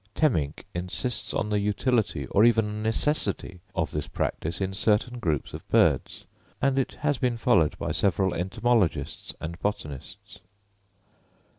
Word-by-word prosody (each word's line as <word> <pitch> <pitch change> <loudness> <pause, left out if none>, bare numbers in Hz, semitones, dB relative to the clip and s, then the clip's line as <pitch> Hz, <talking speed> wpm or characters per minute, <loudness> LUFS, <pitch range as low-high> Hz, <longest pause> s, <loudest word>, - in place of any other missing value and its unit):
Temminck 80 - +1
insists 100 +6 -3
on 105 - -1
the 105 - +2
utility 105 - 0
or 100 - +5
even 110 -2 +3
necessity 110 -5 0 0.2
of 85 -4 0
this 75 -1 -3
practice 80 - -2
in 95 -1 -2
certain 110 +4 +1
groups 80 - -1
of - - -8
birds; - - +2 0.3
and 135 -1 +2
it 135 - -1
has 145 -3 +1
been 125 -2 +1
followed 115 -10 +3
by - - -3
several 95 -2 +1
entomologists 105 +2 0
and 85 +2 -6
botanists. 75 -10 -5
105 Hz, 135 wpm, -27 LUFS, 90-120 Hz, 0.3 s, or